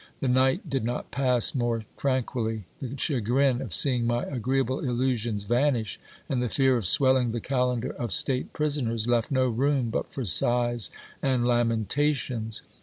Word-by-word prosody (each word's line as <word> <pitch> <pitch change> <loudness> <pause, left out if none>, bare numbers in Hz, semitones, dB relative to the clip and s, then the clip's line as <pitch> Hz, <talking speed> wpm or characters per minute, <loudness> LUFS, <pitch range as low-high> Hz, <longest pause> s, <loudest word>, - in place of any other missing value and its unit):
The 135 - -1
night 130 +8 +2
did 135 -5 -1
not 120 +2 -3
pass 125 -4 +2
more 120 -3 0
tranquilly: 120 -5 -1 0.2
the 135 +1 -5
chagrin 130 0 +1
of 125 -8 -5
seeing 125 - +1
my 120 0 0
agreeable 130 0 -1
illusions 120 -4 -1
vanish, 120 -1 0 0.3
and 130 -2 -1
the 125 - -1
fear 135 0 +3
of 110 -7 0
swelling 130 0 +3
the 120 - -1
calendar 125 0 -1
of 120 -4 -5
state 130 -1 0
prisoners, 130 -7 -1
left 120 -2 +1
no 130 -2 +2
room 130 0 +1
but - - -3
for 130 - -4
sighs 120 +3 +1 0.3
and 130 -3 +1
lamentations. 120 0 0
125 Hz, 155 wpm, -27 LUFS, 115-135 Hz, 0.3 s, fear